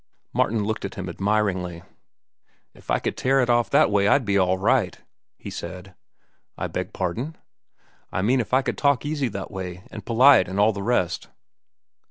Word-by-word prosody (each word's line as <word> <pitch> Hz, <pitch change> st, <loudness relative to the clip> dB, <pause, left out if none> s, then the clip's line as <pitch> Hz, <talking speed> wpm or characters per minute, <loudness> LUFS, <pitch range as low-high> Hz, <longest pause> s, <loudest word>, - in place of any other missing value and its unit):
Martin 110 Hz, -1 st, +1 dB
looked 110 Hz, +1 st, -3 dB
at 100 Hz, -, -5 dB
him 95 Hz, -1 st, -5 dB
admiringly. 95 Hz, -2 st, -1 dB, 0.9 s
"If -, -, -20 dB
I -, -, +3 dB
could -, -, -3 dB
tear 135 Hz, +1 st, +2 dB
it 125 Hz, -2 st, +2 dB
off 120 Hz, -1 st, +2 dB
that -, -, +4 dB
way, 100 Hz, 0 st, +3 dB
I'd 130 Hz, +4 st, +3 dB
be 100 Hz, -1 st, 0 dB
all 95 Hz, -1 st, +3 dB
right," 105 Hz, -2 st, +1 dB, 0.4 s
he -, -, -8 dB
said. 90 Hz, +1 st, -8 dB, 0.6 s
"I -, -, -3 dB
beg -, -, -4 dB
pardon?" 115 Hz, -, -3 dB, 0.7 s
"I 95 Hz, -, -1 dB
mean 125 Hz, +5 st, +3 dB
if 115 Hz, -, -3 dB
I 130 Hz, +1 st, +3 dB
could -, -, -3 dB
talk 140 Hz, -1 st, +2 dB
easy 145 Hz, -3 st, -1 dB
that 100 Hz, -3 st, -6 dB
way, 95 Hz, -2 st, -6 dB
an' 105 Hz, -, -7 dB
polite, 120 Hz, +3 st, +5 dB
an' 95 Hz, -, -4 dB
all 105 Hz, +2 st, +4 dB
the 100 Hz, -, -5 dB
rest." 100 Hz, -6 st, 0 dB
105 Hz, 185 wpm, -24 LUFS, 95-125 Hz, 0.9 s, polite